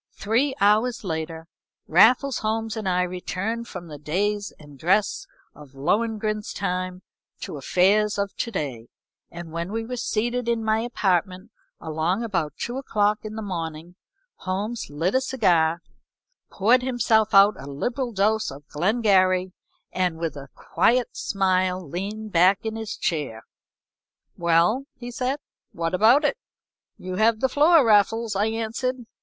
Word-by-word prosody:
Three 245 Hz, +7 st, 0 dB
hours 215 Hz, +5 st, +2 dB
later 160 Hz, -2 st, -4 dB, 0.4 s
Raffles 245 Hz, -, +4 dB
Holmes 220 Hz, 0 st, -2 dB
and 215 Hz, -4 st, -2 dB
I 180 Hz, 0 st, +2 dB
returned 190 Hz, +6 st, -4 dB
from 180 Hz, -2 st, -8 dB
the 150 Hz, -3 st, -10 dB
days 200 Hz, +7 st, -1 dB
and 145 Hz, -3 st, -15 dB
dress 200 Hz, -, +1 dB, 0.3 s
of 145 Hz, -2 st, -15 dB
Lohengrin's 215 Hz, +7 st, -1 dB
time 185 Hz, -1 st, -3 dB, 0.4 s
to -, -, -6 dB
affairs 200 Hz, +8 st, +2 dB
of 200 Hz, -1 st, -2 dB
to 235 Hz, -, -2 dB
day, 135 Hz, -, -4 dB, 0.4 s
and 170 Hz, -1 st, -9 dB
when 170 Hz, +3 st, -4 dB
we 225 Hz, +1 st, -3 dB
were 250 Hz, +2 st, -5 dB
seated 235 Hz, +1 st, -1 dB
in 230 Hz, -1 st, 0 dB
my 220 Hz, 0 st, +1 dB
apartment 195 Hz, -3 st, -1 dB, 0.3 s
along 165 Hz, +6 st, -1 dB
about 170 Hz, -9 st, -2 dB
two 240 Hz, +2 st, -4 dB
o'clock 210 Hz, -5 st, +1 dB
in 215 Hz, 0 st, -7 dB
the 220 Hz, -, -5 dB
morning, 165 Hz, -3 st, -5 dB, 0.4 s
Holmes 205 Hz, +5 st, -4 dB
lit 160 Hz, +6 st, -1 dB
a 260 Hz, -, +3 dB
cigar, 175 Hz, -11 st, +1 dB, 0.7 s
poured 235 Hz, +6 st, +3 dB
himself 235 Hz, -4 st, +2 dB
out 200 Hz, +2 st, +7 dB
a 135 Hz, -, -9 dB
liberal 240 Hz, -, -3 dB
dose 215 Hz, +1 st, +1 dB
of 140 Hz, +2 st, -11 dB
Glengarry, 185 Hz, 0 st, +2 dB, 0.4 s
and 180 Hz, -3 st, -1 dB
with 165 Hz, -2 st, -3 dB
a 140 Hz, -1 st, -9 dB
quiet 245 Hz, +1 st, +1 dB
smile, 185 Hz, -2 st, 0 dB
leaned 205 Hz, +7 st, -5 dB
back 185 Hz, +4 st, +4 dB
in 220 Hz, 0 st, -3 dB
his 220 Hz, -1 st, -5 dB
chair. 145 Hz, -, -2 dB, 0.9 s
"Well," 170 Hz, +11 st, +2 dB
he 245 Hz, 0 st, -7 dB
said, 255 Hz, +3 st, -2 dB, 0.4 s
"what 165 Hz, 0 st, -2 dB
about 230 Hz, -, +5 dB
it?" 295 Hz, -, 0 dB, 0.6 s
"You 185 Hz, 0 st, -6 dB
have 220 Hz, +1 st, +3 dB
the 265 Hz, -, +2 dB
floor, 300 Hz, +1 st, +5 dB
Raffles," 220 Hz, +1 st, +3 dB
I 205 Hz, +3 st, +1 dB
answered. 230 Hz, +3 st, -3 dB
205 Hz, 145 wpm, -24 LUFS, 175-225 Hz, 0.9 s, out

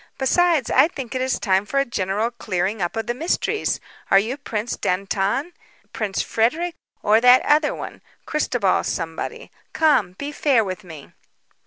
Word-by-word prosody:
"Besides, 305 Hz, 0 st, +2 dB
I -, -, +6 dB
think 270 Hz, -7 st, -7 dB
it 255 Hz, -, -2 dB
is 260 Hz, 0 st, 0 dB
time 190 Hz, -2 st, +2 dB
for 275 Hz, +6 st, -1 dB
a 275 Hz, -, +2 dB
general 210 Hz, 0 st, -1 dB
clearing 200 Hz, -2 st, -2 dB
up 175 Hz, +3 st, -2 dB
of 225 Hz, -1 st, -2 dB
the 240 Hz, -, -1 dB
mysteries. 335 Hz, -, -1 dB, 0.3 s
Are 195 Hz, -, +6 dB
you 220 Hz, +6 st, +1 dB
Prince 235 Hz, -5 st, -4 dB
Dantan, 195 Hz, -, -1 dB, 0.4 s
Prince 205 Hz, -3 st, -2 dB
Frederic, 315 Hz, +11 st, 0 dB, 0.3 s
or 215 Hz, +2 st, +4 dB
that 250 Hz, +1 st, +6 dB
other 300 Hz, 0 st, +3 dB
one -, -, -8 dB, 0.2 s
Christobal 245 Hz, -10 st, +1 dB
somebody? 165 Hz, -, -4 dB, 0.2 s
Come, 280 Hz, -, +3 dB
be 285 Hz, +10 st, -6 dB
fair 275 Hz, -6 st, +2 dB
with 190 Hz, +1 st, -5 dB
me." 160 Hz, -6 st, -12 dB
235 Hz, 160 wpm, -22 LUFS, 195-285 Hz, 0.4 s, I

